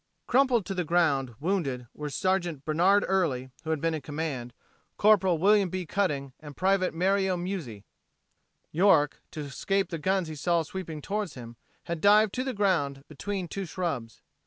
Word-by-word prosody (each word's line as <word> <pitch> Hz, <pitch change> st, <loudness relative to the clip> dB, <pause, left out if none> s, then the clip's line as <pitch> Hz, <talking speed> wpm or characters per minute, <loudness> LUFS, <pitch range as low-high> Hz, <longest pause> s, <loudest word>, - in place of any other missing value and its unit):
Crumpled 250 Hz, -5 st, +3 dB
to 195 Hz, -, -3 dB
the 180 Hz, -1 st, -1 dB
ground, 150 Hz, -7 st, +1 dB
wounded, 145 Hz, -8 st, -1 dB
were 150 Hz, 0 st, -5 dB
Sergeant 175 Hz, -3 st, -1 dB
Bernard 180 Hz, +6 st, +3 dB
Early, 145 Hz, -10 st, 0 dB
who 160 Hz, -, -6 dB
had 160 Hz, -2 st, 0 dB
been 165 Hz, +2 st, 0 dB
in 155 Hz, -, -3 dB
command; 145 Hz, -6 st, -4 dB, 0.5 s
Corporal 195 Hz, -5 st, +4 dB
William 200 Hz, +2 st, +4 dB
B. 185 Hz, 0 st, -3 dB
Cutting 145 Hz, -8 st, -1 dB
and 150 Hz, -2 st, -11 dB
Private 185 Hz, -2 st, +1 dB
Mario 190 Hz, +1 st, +2 dB
Muzzi. 170 Hz, -, -5 dB, 0.9 s
York, 160 Hz, -4 st, +3 dB
to 155 Hz, -, -6 dB
escape 190 Hz, +8 st, -1 dB
the 165 Hz, -, -3 dB
guns 190 Hz, +2 st, 0 dB
he 155 Hz, -, -6 dB
saw 170 Hz, +3 st, +1 dB
sweeping 160 Hz, -3 st, -7 dB
toward 205 Hz, -4 st, -2 dB
him, 120 Hz, -2 st, -10 dB, 0.3 s
had 170 Hz, -2 st, -4 dB
dived 210 Hz, 0 st, +5 dB
to 255 Hz, -, -1 dB
the 260 Hz, -2 st, -3 dB
ground 165 Hz, -9 st, +1 dB
between 185 Hz, +5 st, -4 dB
two 195 Hz, +3 st, -4 dB
shrubs. 140 Hz, -, -4 dB
170 Hz, 165 wpm, -28 LUFS, 145-195 Hz, 0.9 s, dived